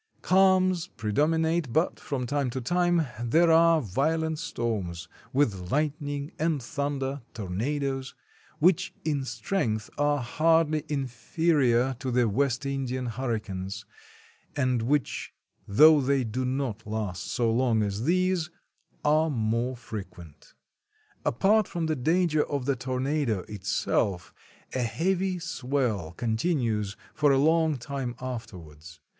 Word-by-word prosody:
Calms 185 -2 +4
predominate, 155 +6 0
but 160 +8 +1
from 130 -3 -3
time 140 +1 0
to 130 - -4
time 175 +4 +2 0.2
there 165 +8 +4
are 165 0 +6
vio 135 - +1
lent 160 -1 -2
storms, 95 - -3 0.2
with 100 -10 0
lightning 145 -1 -1
and 160 -1 +1
thunder 140 +1 -3
(tornadoes), 135 +7 -3 0.4
which 170 +2 +2
in 145 -4 0
strength 115 - -2
are 145 0 +3
hardly 155 +4 +2
inferior 135 -1 +1
to 130 -2 -3
the 125 -1 +2
West 130 +4 0
Indian 130 -2 -2
hurricanes, 110 -5 -4 0.7
and 130 -4 +1
which, 140 +4 -1 0.3
though 150 +8 +7
they 135 0 +1
do 125 +3 -2
not 125 -4 -3
last 105 -5 -3
so 115 -2 +1
long 115 -2 +2
as 100 +3 -2
these, 185 0 +1 0.6
are 155 +2 +3
more 120 0 -1
frequent. 90 -10 -10 0.7
Apart 205 - +3
from 170 -1 -3
the 160 -1 0
danger 160 +3 +2
of 140 -3 -3
the 140 0 +1
tornado 130 -3 -1
itself, 95 -2 -1 0.4
a 130 - 0
heavy 180 - 0
swell 125 - -2
continues 110 - -1 0.2
for 150 -2 +3
a 135 - +4
long 160 +1 +3
time 130 -1 -4
afterwards. 85 - -8
135 Hz, 120 wpm, -27 LUFS, 115-155 Hz, 0.7 s, though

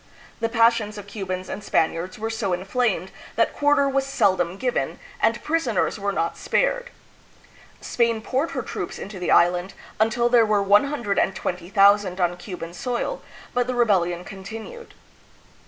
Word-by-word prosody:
The 230 0 0
passions 230 -2 +2
of 205 - -8
Cu 205 -1 -7
bans 185 0 -3
and 210 - -6
Spaniards 170 +1 0
were 225 +1 -3
so 215 -5 -1
inflamed 190 0 -1 0.2
that 230 - +2
quarter 290 -1 +3
was 275 0 +1
seldom 190 -9 +1
given, 250 +2 -1 0.2
and - - +1
prisoners 265 - 0
were 200 0 -1
not 165 -4 -2
spared. - - 0 0.9
Spain 230 -2 +1
poured 265 +8 -1
her - - -1
troops - - -5
into 195 -1 -7
the 180 - -3
island 175 +2 +3 0.2
until 230 +2 +2
there 240 -1 +5
were 210 -2 +2
120,000 200 - +2
on 175 -1 +1
Cuban 180 -2 -7
soil, 250 - -3 0.3
but 245 0 +1
the 250 - -2
rebellion 180 -7 +1
continued. 220 - -9
210 Hz, 145 wpm, -23 LUFS, 185-240 Hz, 0.9 s, there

